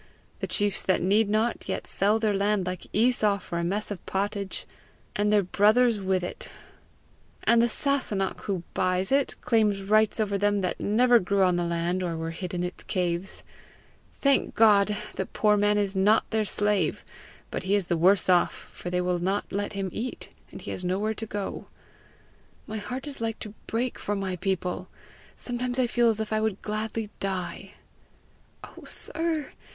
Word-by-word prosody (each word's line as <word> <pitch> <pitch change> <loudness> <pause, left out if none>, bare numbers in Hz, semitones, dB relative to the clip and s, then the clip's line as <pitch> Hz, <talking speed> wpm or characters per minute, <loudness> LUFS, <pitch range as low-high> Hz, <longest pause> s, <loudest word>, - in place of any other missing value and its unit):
The - - -3
chiefs 205 -2 +1
that 185 - +1
need 205 +3 +3
not, 220 +3 0
yet - - -2
sell 205 +3 +2
their 220 -2 +1
land 200 -1 +1
like 180 -1 -5
Esau 215 -2 +3
for 170 -3 -5
a - - -1
mess 205 +5 -1
of 200 - -6
pottage 200 0 -3 0.5
and 210 +1 +1
their 210 -1 +4
brothers 215 +4 +3
with 190 -1 0
it! 180 - -6 0.9
And 235 0 +5
the 235 - +4
Sasunnach 220 -8 +1
who 190 -4 -2
buys 185 +2 0
it, 275 0 +2
claims 210 -4 +2
rights 215 +2 +3
over 200 -2 0
them 205 0 +2
that 180 - -2
never 240 +3 +4
grew 195 +1 +1
on 180 -1 +3
the 175 0 0
land 170 +2 -1
or 170 -2 -2
were 165 0 -3
hid 180 +1 -5
in 175 - -1
its 180 0 -5
caves! 180 +1 -2 0.7
Thank 275 -1 +1
God, 210 -2 +5 0.2
the - - -3
poor 210 -1 +2
man 205 0 +3
is 200 -1 0
not 205 +3 +3
their 220 -1 +1
slave, 205 -5 0 0.5
but - - -3
he 190 +2 +1
is 200 -3 +1
the 175 - 0
worse 180 +4 +4
off, 180 -1 +3 0.2
for 175 - -6
they 180 0 0
will 180 -1 0
not 195 +4 -1
let 205 +1 -2
him 195 -2 -3
eat, 245 +3 -5 0.2
and - - -9
he - - -6
has 180 - -5
nowhere 195 +5 0
to 220 +1 -5
go. 205 -1 -5 1.0
My 220 - -5
heart 250 +6 -5
is 280 -5 -6
like 225 -1 -2
to 210 - -8
break 240 +2 -2
for 205 - -2
my 190 -2 -2
people. 185 0 -2 0.5
Sometimes 245 0 -3
I 255 - +3
feel 240 0 +3
as 220 -1 +1
if 220 0 -2
I 215 - +1
would 220 -3 -1
gladly 215 0 -3
die." 190 0 -4 0.9
"Oh, - - -12
sir! 325 -3 -2
205 Hz, 185 wpm, -27 LUFS, 185-220 Hz, 1.0 s, And